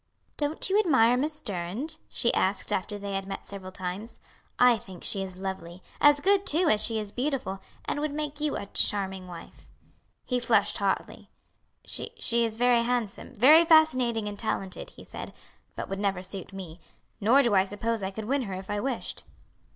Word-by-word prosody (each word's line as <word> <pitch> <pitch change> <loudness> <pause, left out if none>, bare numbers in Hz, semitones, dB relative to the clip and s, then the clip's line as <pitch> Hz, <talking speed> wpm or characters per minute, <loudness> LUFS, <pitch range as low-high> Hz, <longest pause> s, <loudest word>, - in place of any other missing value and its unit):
"Don't 295 +1 0
you 390 +2 +3
admire 250 - +4
Miss 300 +4 -1
Durand?" 210 - -4
she 235 - +1
asked, 195 +1 +1
after 205 +2 -2
they 200 0 -5
had 195 0 -3
met 195 - -6
several 190 -2 -8
times. 185 +4 -6 0.4
"I 245 -2 +6
think 190 -4 -12
she 200 -4 +3
is 190 -1 -6
lovely; 185 -2 -6 0.2
as 290 0 +6
good, 395 +2 +3
too, 330 0 +2
as 210 0 +4
she 225 - +1
is 210 -2 -4
beautiful; 250 -7 -2 0.3
and - - -2
would 305 -1 -1
make 295 0 -4
you 300 -1 0
a - - -5
charming 190 -2 0
wife." 175 -2 -12 0.6
He 250 -1 0
flushed 220 -4 +2
hotly. 200 -1 -2 0.6
"She - - -4 0.3
is 225 -1 -2
very 245 0 +4
handsome, 240 0 -2
very 295 +9 +7
fascinating 255 -9 +4
and 205 -1 -6
talented," 195 -4 -3
he - - -14
said; - - -8 0.4
"but - - -5
would 195 0 -4
never 195 -3 -1
suit 190 0 -7
me. 180 -3 -9 0.4
Nor 245 +7 +5
do 235 -4 +2
I 190 -1 +5
suppose 220 +3 -2
I 190 - -2
could 210 +2 -6
win 275 +4 +1
her 195 -6 -4
if 190 +1 -7
I 205 - -1
wished." 255 +2 -4
220 Hz, 185 wpm, -27 LUFS, 195-270 Hz, 0.6 s, very